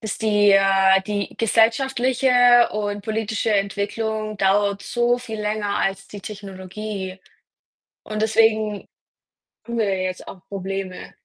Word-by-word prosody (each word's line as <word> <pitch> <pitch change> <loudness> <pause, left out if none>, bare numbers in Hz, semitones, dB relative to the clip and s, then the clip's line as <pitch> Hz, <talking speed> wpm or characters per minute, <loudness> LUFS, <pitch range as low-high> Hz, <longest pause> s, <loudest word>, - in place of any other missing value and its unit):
bis 220 -2 -4
die 205 -2 +3
äh, 195 -1 +4
die 205 -1 -3
gesellschaftliche 245 +2 +3
und 205 -1 -3
politische 220 0 -2
Entwicklung 215 +2 -2
dauert 200 +1 +1
so 240 0 +1
viel 225 -3 -7
länger 210 -1 -2
als 195 0 -2
die 205 - -10
Technologie 195 -1 -7 0.8
und 215 0 -4
deswegen 220 -2 +1 0.8
haben 235 0 -4
wir 220 - +2
ja 190 - -3
jetzt 185 - -8
auch 190 - -10
Probleme. 195 -1 -5
210 Hz, 125 wpm, -22 LUFS, 195-225 Hz, 0.8 s, äh